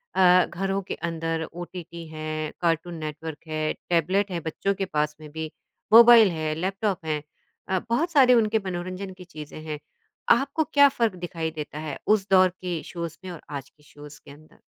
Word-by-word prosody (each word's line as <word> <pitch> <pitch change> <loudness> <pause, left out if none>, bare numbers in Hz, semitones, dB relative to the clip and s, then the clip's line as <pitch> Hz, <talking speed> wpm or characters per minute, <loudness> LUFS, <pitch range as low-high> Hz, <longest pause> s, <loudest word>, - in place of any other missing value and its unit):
अ, 180 -1 +6
घरों 195 +2 -2
के - - -5
अंदर 165 -1 -3
ओटीटी 170 -1 -8
है, 155 0 -4
कार्टून 170 0 0
नेटवर्क 155 +1 -6
है, 155 0 -1 0.2
टैबलेट 185 +4 +1
है, 170 - -2
बच्चों 165 +5 -1
के 195 - -2
पास 150 -3 -1
में 150 - -10
भी 160 0 -5 0.4
मोबाइल 230 -3 +9
है, 155 -1 -2
लैपटॉप 190 0 -2
है 150 -1 -1 0.5
अ, 190 -1 +2
बहुत 325 +9 +1
सारे 260 -5 +6
उनके 220 -2 +3
मनोरंजन 185 +1 -5
की 185 0 -12
चीज़ें 155 -2 -9
हैं। 150 -2 -5 0.5
आपको 280 +3 +3
क्या 285 -1 +8
फ़र्क 230 -7 0
दिखाई 165 -2 -3
देता 150 -1 -6
है, 155 -3 -5
उस 210 -2 +3
दौर 185 -1 +6
के 180 -2 -5
शोज़ 170 -2 -6
में 185 - -5
और 170 - -9
आज 140 -2 -6
के 150 - -28
शोज़ 145 0 -13
के - - -12
अंदर? 155 +2 -17
170 Hz, 185 wpm, -25 LUFS, 155-195 Hz, 0.5 s, मोबाइल